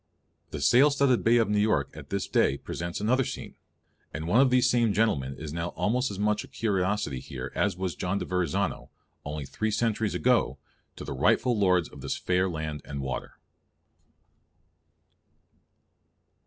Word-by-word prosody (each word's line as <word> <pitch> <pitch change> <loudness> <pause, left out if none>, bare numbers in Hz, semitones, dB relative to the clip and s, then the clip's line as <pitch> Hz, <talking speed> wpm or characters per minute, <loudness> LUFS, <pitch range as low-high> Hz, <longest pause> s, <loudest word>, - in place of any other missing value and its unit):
The 75 - -6
sail 125 - +6
studded 140 -3 +2
bay 115 +1 +5
of 115 - +3
New 105 0 +1
York 105 -10 +1
at - - -10
this 100 -1 -2
day - - +2
presents 85 0 -5
another 125 +6 +2
scene; - - -6 0.6
and 80 +2 -5
one 115 +9 +5
of 135 - +5
these 125 0 +4
same 120 -4 +2
"gentlemen" 70 -13 +1
is 75 -2 -7
now 85 +1 -2
almost 125 +5 +1
as 100 - -6
much 105 +1 0
a - - -12
curiosity 100 - -1
here - - -7
as 100 -3 0
was 95 -2 -2
John 90 +2 -2
de - - -3
Verrazano, 90 -5 -1 0.3
only 75 0 -5
three 110 +10 -2
centuries 110 -1 0
ago, 120 - +2 0.4
to - - -8
the - - -4
rightful 120 - +2
lords 90 -6 +2
of 70 - -13
this 70 - -3
fair 90 +1 +1
land 80 -3 -4
and 70 -1 -6
water. 65 -1 -5
100 Hz, 170 wpm, -27 LUFS, 80-115 Hz, 0.6 s, sail